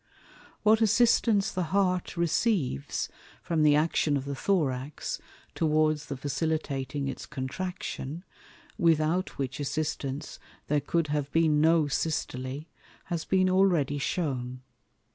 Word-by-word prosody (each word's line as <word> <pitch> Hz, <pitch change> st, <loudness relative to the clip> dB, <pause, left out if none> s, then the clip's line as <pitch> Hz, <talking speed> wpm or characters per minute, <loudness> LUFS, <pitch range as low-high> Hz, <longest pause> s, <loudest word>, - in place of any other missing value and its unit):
What 220 Hz, +1 st, +5 dB
assistance 225 Hz, -2 st, +4 dB
the 180 Hz, -2 st, -1 dB
Heart 185 Hz, -3 st, +1 dB
receives 170 Hz, -, 0 dB, 0.4 s
from 165 Hz, -2 st, 0 dB
the 150 Hz, -1 st, +6 dB
action 150 Hz, -1 st, +2 dB
of 135 Hz, -, -5 dB
the 140 Hz, -, -3 dB
Thorax 140 Hz, -4 st, -1 dB, 0.3 s
towards 155 Hz, -1 st, +1 dB
the 140 Hz, -, -4 dB
facilitating 145 Hz, -1 st, -2 dB
its 135 Hz, -, -5 dB
Contraction, 155 Hz, +2 st, -5 dB, 0.6 s
without 165 Hz, +2 st, +2 dB
which 135 Hz, -1 st, -3 dB
assistance 145 Hz, -1 st, -3 dB, 0.3 s
there 145 Hz, 0 st, +2 dB
cou'd 160 Hz, +2 st, 0 dB
have 145 Hz, -1 st, -1 dB
been 155 Hz, -2 st, +3 dB
no 160 Hz, -1 st, +4 dB
Systole, 135 Hz, -2 st, -2 dB, 0.4 s
has 170 Hz, -3 st, -3 dB
been 185 Hz, -1 st, +3 dB
already 180 Hz, -7 st, +3 dB
shewn. 130 Hz, -5 st, -2 dB
155 Hz, 115 wpm, -28 LUFS, 140-175 Hz, 0.6 s, the